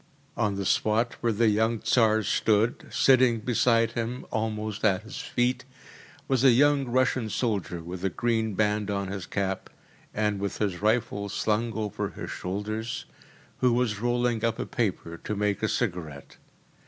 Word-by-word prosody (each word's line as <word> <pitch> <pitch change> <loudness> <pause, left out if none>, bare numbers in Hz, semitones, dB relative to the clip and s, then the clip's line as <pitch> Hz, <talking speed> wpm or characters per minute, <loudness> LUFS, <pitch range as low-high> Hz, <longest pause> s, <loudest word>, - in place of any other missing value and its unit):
On 105 -4 0
the 100 0 -3
spot 110 +5 +1
where 115 - +2
the 110 +1 +3
young 110 +2 +2
Tsar 110 -1 +3
stood, 110 +3 +1
sitting 130 -3 +4
beside 115 0 +2
him, 120 +2 -4
almost 110 -1 -3
at 105 -1 +2
his 115 +5 -8
feet, 125 +1 0 0.6
was 130 -2 +1
a 135 - +8
young 140 +3 +4
Russian 130 -2 +1
soldier 100 -6 -2
with 90 +2 -7
a 95 - +2
green 110 0 -1
band 105 0 +1
on 100 -1 -2
his 95 -3 -5
cap, 95 -1 -2 0.4
and 105 -1 0
with 100 0 -3
his 100 -4 -2
rifle 105 -2 0
slung 110 +3 0
over 105 -2 -3
his - - -7
shoulders, 110 +5 -4 0.5
who 125 -2 +3
was 120 -4 0
rolling 120 -1 0
up 115 -1 +1
a - - -3
paper 90 -7 -2
to 105 - -4
make 105 -1 0
a - - +1
cigarette. 75 -6 -3
110 Hz, 160 wpm, -27 LUFS, 100-120 Hz, 0.6 s, a